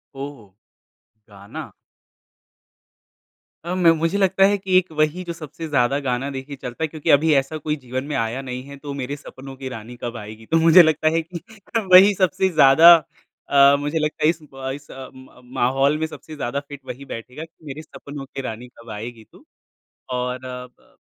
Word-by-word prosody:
ओहो, 135 -4 -8 0.8
गाना। 100 -1 -10 1.9
अ, 170 - -4
म 180 -2 +2
मुझे 165 +5 0
लगता 195 -1 +3
है 205 - +1
कि 190 -1 +2
एक 185 -2 +1
वही 155 +4 +1
जो 170 -1 -5
सबसे 160 0 -8
ज़्यादा 140 -1 +1
गाना 130 +2 -1
देखिए 135 +2 -6
चलता 125 +5 -5
है, - - +1
क्योंकि 155 -1 -5
अभी 155 +2 +2
ऐसा 135 +4 -7
कोई 150 -1 0
जीवन 130 +1 -4
में - - -1
आया 115 +3 -1
नहीं 125 -1 -6
है 140 - -9
तो 140 - -4
मेरे 135 +3 -4
सपनों 135 -2 -11
की 130 0 -7
रानी 115 0 -9
कब 120 -1 -4
आएगी 110 +1 -10
तो - - +6
मुझे 165 +2 +9
लगता 155 -1 +1
है 165 - +2
कि 170 +2 -8 0.5
वही 190 +3 +9
सबसे 185 +2 +2
ज़्यादा 160 +1 +8 0.6
अ, 140 0 +6
मुझे 145 +3 -2
लगता 150 0 -2
है 155 - +5
इस 165 -1 -1
ब 135 0 -5
इस 145 0 -14
अ, 130 -1 -9
म 130 -1 -16 0.2
माहौल 135 +4 +2
में 160 - -1
सबसे 155 0 -11
ज़्यादा 140 -1 -3
फिट 145 -1 -9
वही 135 +3 -8
बैठेगा 125 +5 -8
कि 160 -1 -17
मेरे 145 +1 -7
सपनों 145 -2 -10
की 135 0 -7
रानी 120 -1 -6
कब 115 0 -14
आएगी 110 +2 -7
तू। - - -19 0.7
और 125 +1 -3
अ, 125 0 -6
ब - - -28
140 Hz, 195 wpm, -22 LUFS, 125-160 Hz, 1.9 s, मुझे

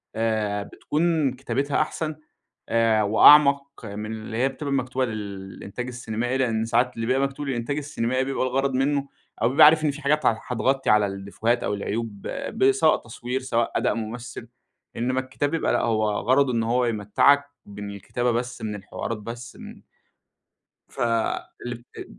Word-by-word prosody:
آآ، 110 -2 0
بتكون 155 +1 0
كتابتها 135 +3 -1
أحسن 155 0 -3 0.5
آآ، 115 -2 +3
وأعمق 140 +5 +5
من 105 +1 -6
اللي 110 0 -6
هي 130 +3 +2
بتبقى 140 +1 -4
مكتوبة 130 -1 0
للإنتاج 100 +1 -6
السينمائي، 120 0 -3
لأن 115 -4 0
ساعات 120 +2 +1
اللي 115 - -3
بيبقى 130 +2 +2
مكتوب 135 +1 -7
للإنتاج 130 +2 -2
السينمائي 130 -3 -1
بيبقى 135 0 -1
الغرض 135 +1 0
منه 140 +2 +1 0.4
أو 115 - +4
بيبقى 135 +3 +7
عارف 155 +1 +6
إن 150 - +2
في 145 +2 -9
حاجات 150 +2 +1
ه 115 - +3
هتغطي 135 +2 0
على 105 -1 +5
الديفوهات 100 +5 -2
أو - - -1
العيوب 105 0 -4 0.2
ب 395 +1 +3
سواء 400 - +3
تصوير 120 +2 -4
سواء 120 -3 0
أداء - - +1
ممثل، 115 +1 -6 0.5
إنما 130 +2 0
الكتاب 135 +3 -3
يبقى 165 - +1
لأ - - +2
هو 110 -2 +1
غرضه 130 +6 +2
إنه 115 0 0
هو 125 0 +2
يمتّعك 120 +6 +3 0.2
ب 100 0 -11
من 100 0 -5
الكتابة 120 +5 -1
بس 120 +1 -3
من 105 -1 -3
الحوارات 105 +2 -5
بس 120 +3 -8
من - - -11 1.1
ف - - -10 0.7
الب 120 -1 -6
أ - - -5
120 Hz, 165 wpm, -24 LUFS, 110-135 Hz, 1.1 s, بيبقى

